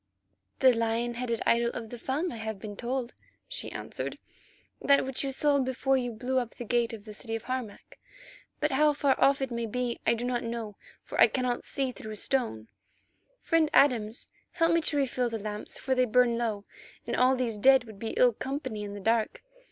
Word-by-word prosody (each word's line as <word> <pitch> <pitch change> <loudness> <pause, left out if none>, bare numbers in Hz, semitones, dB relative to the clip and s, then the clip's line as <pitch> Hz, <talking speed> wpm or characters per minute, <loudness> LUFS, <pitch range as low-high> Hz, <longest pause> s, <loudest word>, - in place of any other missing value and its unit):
"The 260 -1 +7
lion 230 +1 0
headed 235 -1 -2
idol 235 0 +3
of 225 -2 -6
the 245 - -7
Fung, 295 +9 -1
I 235 - -6
have 220 -1 -4
been 205 +1 -8
told," 245 +2 -3 0.3
she - - -5
answered. - - -5 0.6
"That 280 -1 +4
which 265 +1 -2
you 275 - -1
saw 285 +1 +2
before 260 +1 +1
you 245 -2 -1
blew 250 +4 -1
up 240 -2 -5
the 240 - -7
gate 235 0 +1
of 220 -2 -9
the 215 - -9
city 225 +1 -4
Harmac. 240 -2 -6 0.6
But 300 -1 +1
how 300 +2 +4
far 285 -1 +2
off 275 0 +4
it 265 - -3
may 235 -1 -2
be 245 +1 -2
I 235 - +5
do 235 +1 -4
not 245 -1 0
know, 230 -3 -4 0.3
for - - -2
I - - +10
cannot 250 -2 -2
see 270 -2 -1
through 215 -3 -8
stone. 215 - -1 0.8
Friend 330 -2 +3
Adams, 235 -5 +3 0.3
help 330 -1 +3
me 335 0 +3
to 305 -2 +1
refill 255 -3 0
the 225 - -3
lamps, 210 0 -6
for 265 - -1
they 255 -1 +3
burn 245 0 +3
low, 220 -4 -2 0.4
and - - -2
all 255 +1 +4
these 235 -4 -2
dead 265 +4 +6
would 220 -4 -12
be 225 +1 -4
ill 250 -1 +5
company 260 -3 -4
in 205 0 -6
the - - -6
dark. 225 +2 0
245 Hz, 205 wpm, -29 LUFS, 225-265 Hz, 0.8 s, I